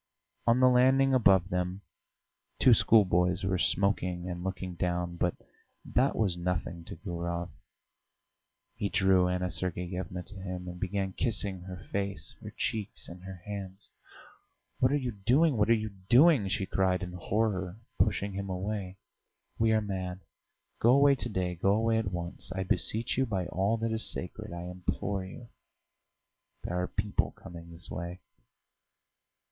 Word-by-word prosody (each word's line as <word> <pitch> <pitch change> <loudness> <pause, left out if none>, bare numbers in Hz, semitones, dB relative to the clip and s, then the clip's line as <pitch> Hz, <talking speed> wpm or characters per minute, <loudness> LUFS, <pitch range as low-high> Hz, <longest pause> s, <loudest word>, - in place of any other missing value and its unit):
On 115 +2 +5
the 130 - +6
landing 130 +2 +5
above 95 -7 +5
them 90 +1 -2 0.8
two 125 - +6
schoolboys 90 -5 +4
were 95 -1 0
smoking 90 -2 0
and 90 -1 -5
looking 95 -1 -4
down, 90 0 -2
but 90 0 0 0.5
that 135 +3 +2
was 100 -6 +1
nothing 85 -1 -3
to - - -7
Gurov; 85 -2 -4 1.2
he 100 - -2
drew 95 -2 +4
Anna 90 0 -1
Sergeyevna 90 0 -3
to 100 +2 -10
him, 90 -1 -5
and 90 0 -7
began 95 0 -2
kissing 100 -5 -1
her 90 +1 -8
face, 100 -5 -3
her - - -8
cheeks, 105 -2 -3
and 90 +1 -10
her 95 -2 -9
hands. 100 -1 -7 0.9
"What 130 0 +4
are 145 - +3
you 125 -3 -2
doing, 125 +9 +3
what 105 0 +2
are 115 - +7
you 110 -1 -3 0.2
doing!" 135 - +6
she 95 0 -1
cried 95 -1 +1
in 90 - -5
horror, 95 0 -1 0.2
pushing 100 0 +1
him 100 0 -4
away. 95 0 -3 0.6
"We 115 0 +4
are 110 0 +3
mad. 95 -2 -4 0.6
Go 120 +3 +5
away 140 0 +6
to 120 -3 -3
day; 90 -4 -1
go 95 +3 +2
away 110 +1 +2
at 105 -4 -2
once.... 85 +1 -4
I 95 0 -2
beseech 110 +6 0
you 130 - +2
by 95 -5 -1
all 100 +5 +1
that 115 0 -1
is 110 0 +3
sacred, - - -4
I 85 0 -6
implore 90 +2 -3
you.... 115 +5 -10 1.1
There 90 0 -2
are 90 - -1
people 105 +1 -1
coming 85 -1 -11
this 85 +1 -10
way!" 85 +1 -5
95 Hz, 155 wpm, -30 LUFS, 90-110 Hz, 1.2 s, are